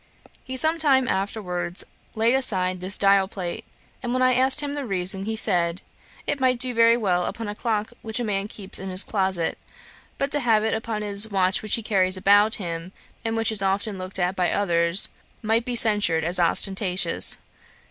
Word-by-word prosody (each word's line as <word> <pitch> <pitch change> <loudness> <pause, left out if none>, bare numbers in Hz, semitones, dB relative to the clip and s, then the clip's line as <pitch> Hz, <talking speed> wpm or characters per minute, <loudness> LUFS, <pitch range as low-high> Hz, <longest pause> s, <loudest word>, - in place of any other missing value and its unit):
He 260 0 -7
sometime 300 -4 +1
afterwards 190 -3 -3 0.3
laid 225 +2 +1
aside 185 -8 +2
this 190 +1 +1
dial 195 -1 +3
plate; 180 -3 -7 0.4
and 245 -1 -4
when 255 0 0
I 255 0 +3
asked 260 +3 +4
him 285 -1 -5
the 290 -1 -5
reason, 190 0 -1
he 220 +1 -3
said, 175 -4 +1 0.4
'It 285 - -3
might 255 -1 +1
do 250 +1 +1
very 230 0 +4
well 180 -6 -1
upon 225 -2 -6
a 205 - -4
clock 215 0 -3
which 220 +1 -5
a - - -2
man 200 -2 -2
keeps 200 -2 -8
in 190 - -7
his 185 +1 +4
closet; 190 -4 -1 0.6
but 275 0 -3
to 295 - +1
have 225 -5 +1
it 220 - -1
upon 220 -1 -4
his 205 +1 +2
watch 190 -2 +2
which 215 - +3
he 230 - -3
carries 185 -3 +1
about 205 +3 +3
with - - +2
him, 170 -1 -7 0.3
and 225 0 -3
which 225 0 0
is 215 -3 +2
often 195 +1 -2
looked 185 +1 -3
at 180 0 -1
by 180 -2 0
others, 170 -2 0 0.3
might 225 +2 0
be 250 -1 -3
censured 205 -8 +5
as 175 +3 +1
ostentatious.' 190 +2 +2
205 Hz, 195 wpm, -23 LUFS, 185-230 Hz, 0.6 s, censured